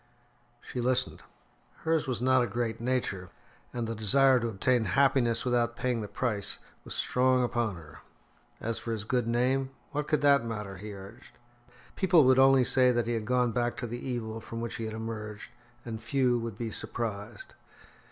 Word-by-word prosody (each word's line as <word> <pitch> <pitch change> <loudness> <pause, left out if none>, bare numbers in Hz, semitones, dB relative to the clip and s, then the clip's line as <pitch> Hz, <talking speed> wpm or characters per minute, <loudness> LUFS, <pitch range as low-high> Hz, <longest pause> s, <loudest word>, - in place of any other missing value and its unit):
She 125 - -5
listened. 125 +1 0 0.6
Hers 160 -2 +1
was 125 -2 -2
not 130 0 +4
a 120 - +1
great 115 -2 -2
nature, 115 -7 -1 0.4
and 120 - -3
the 115 - -3
desire 130 +5 +4
to 115 - -2
obtain 115 +3 +1
happiness 120 +2 +2
without 120 -1 +1
paying 125 -2 -1
the 105 - -4
price 105 -4 -2 0.3
was - - -7
strong 130 0 +2
upon 120 -4 -1
her. 75 -3 -12 0.6
As 115 0 -2
for 115 - -4
his 110 -2 -4
good 120 +2 0
name, 130 +3 +1 0.2
what 150 +1 -2
could 150 -1 +1
that 140 -3 +5
matter? 105 -4 -5
he 105 +3 -8
urged. 100 +5 -12 0.6
People 180 -5 +5
would 130 0 +5
only 135 -1 +6
say 125 0 +4
that 120 -2 +1
he 120 - -1
had 110 -2 -2
gone 125 0 +2
back 120 0 -1
to 125 - -3
the 120 +1 -5
evil 115 -3 -4
from 115 - -7
which 115 0 -4
he 115 - -4
had 110 0 -5
emerged, 110 -2 -6 0.3
and 110 -2 -5
few 125 +1 +1
would 115 -3 -5
be 115 -1 -4
surprised. 105 -1 -5
120 Hz, 180 wpm, -29 LUFS, 110-130 Hz, 0.6 s, only